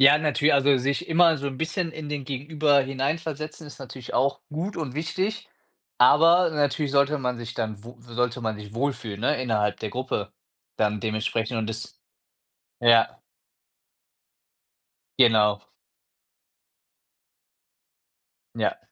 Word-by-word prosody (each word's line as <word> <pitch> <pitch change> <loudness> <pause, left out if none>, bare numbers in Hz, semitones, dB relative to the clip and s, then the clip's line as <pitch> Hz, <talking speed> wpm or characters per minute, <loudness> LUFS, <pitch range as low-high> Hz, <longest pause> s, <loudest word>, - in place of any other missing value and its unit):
Ja, 140 +2 +7
natü 150 -1 +2
also 140 0 +4
sich 140 +7 -1
immer 165 0 +5
so 140 0 -5
'n 135 -2 -4
bisschen 165 +2 -2
in 155 -2 -7
den 145 -2 -4
Gegenüber 145 +2 +1
hineinversetzen 150 +3 -3
ist 145 - -11
natürlich 130 -2 -9
auch 140 +1 +1
gut 170 +7 -4
und 145 -5 -4
wichtig, 190 +8 -3 0.5
aber 165 +7 +6
natürlich 145 -1 0
sollte 140 +2 +3
man 125 -2 -2
sich 115 0 -7
dann 110 -2 -3
wo 120 +2 -11
sollte 120 +1 -2
man 110 -2 -2
sich 105 +1 -11
wohlfühlen, 115 -6 -3
ne, 130 +2 +1
innerhalb 105 -4 0
der 110 - -5
Gruppe 130 +3 -3 0.4
dann 105 -1 +1
dementsprechend 110 +2 -2
und 110 - -2
das 110 0 -5 0.8
ja. 115 -1 +4 2.0
Genau. 105 -4 +4 2.9
Ja. - - -1
135 Hz, 125 wpm, -25 LUFS, 115-150 Hz, 2.9 s, Ja